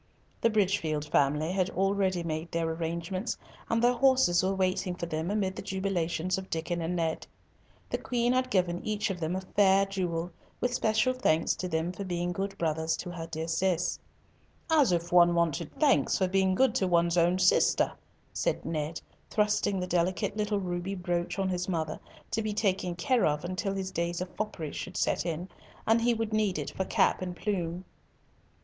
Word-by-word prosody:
The 230 - +4
Bridgefield 190 -8 +1
family 150 +2 +2
had 185 -1 +1
already 190 -1 +1
made 160 0 -4
their 165 0 0
arrangements, 170 +6 -3 0.3
and 230 +1 +1
their 245 +1 +5
horses 260 -8 +4
were 190 +1 0
waiting 185 -1 0
for 175 - -4
them 160 +1 -3
amid 200 -2 0
the - - -5
jubilations 185 -2 -1
of 190 - -10
Diccon 170 +1 -2
and 165 +2 -2
Ned. 165 -2 -1 0.6
The - - -1
Queen 240 0 +1
had 255 0 +1
given 180 -5 +1
each 215 -1 -1
of 180 - -5
them 165 +2 -1
a 190 - -2
fair 195 +1 +3
jewel, 180 -3 -2 0.3
with 250 0 0
special 235 +2 +2
thanks 165 -11 +2
to 185 - -3
them 160 0 -1
for 185 +2 -6
being 175 -1 -2
good 195 +2 -3
brothers 160 0 0
to 175 - -6
her 165 -2 -6
dear 160 0 -4
Cis. 175 +1 0 0.7
"As 295 -9 +5
if 170 0 -1
one 175 -1 +6
wanted 170 -3 0
thanks 295 -3 +3
for 190 - +2
being 190 0 +2
good 265 +5 +3
to 190 - +1
one's 170 -1 +3
own 175 +1 +3
sister," 185 - +4 0.4
said - - -1
Ned, 155 0 -2 0.3
thrusting 210 -2 +1
the 180 - -1
delicate 180 +2 0
little 210 -1 0
ruby 180 +1 -3
brooch 175 -1 -2
on 195 -1 0
his 180 0 -2
mother 160 -3 -2 0.3
to 225 - 0
be 215 -1 -2
taken 190 -4 0
care 240 +8 +2
of 150 +2 -1
till 195 0 -2
his 190 -1 -3
days 170 0 -2
of 180 0 -6
foppery 185 -8 -4
should 185 - -6
set - - 0
in, 170 +2 -3 0.4
and 225 +1 +4
he 235 0 +3
would 225 -1 -2
need 210 -4 +1
it - - -4
for 190 - -2
cap - - +2
and 180 -1 -4
plume. 180 -3 -2
185 Hz, 190 wpm, -29 LUFS, 170-200 Hz, 0.7 s, one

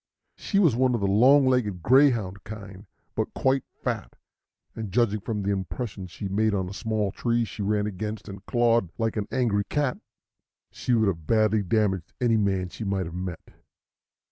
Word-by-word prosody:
She 200 - -2
was 170 - +4
one 125 0 +2
of 115 - -2
the - - +1
long 130 +8 +5
legged 110 -9 +1
greyhound 115 -8 +3
kind, 100 -2 -9 0.3
but - - -2
quite 135 0 +2 0.2
fat; - - -3 0.6
and, 110 -4 -5
judging 110 0 +2
from 105 0 -3
the 100 - 0
impression 100 0 -4
she 90 +3 -6
made 105 +2 +1
on 95 -2 -1
a 95 - -7
small 110 -2 -1
tree 115 +2 0
she 105 - -7
ran 105 +1 +1
against 105 +2 -5
and 100 -1 -9
clawed 115 -6 +2
like 115 -1 -1
an 105 -1 -2
angry 110 -5 +1
cat, 140 +3 -1 0.7
she 125 - 0
would 110 -2 +3
have 80 -5 -2
badly 110 -1 +3
damaged 95 -3 0
any 120 -2 +3
man 95 -3 0
she 110 - -7
might 95 -2 -1
have 80 - -7
met. 90 -1 -6
105 Hz, 180 wpm, -26 LUFS, 100-120 Hz, 0.7 s, long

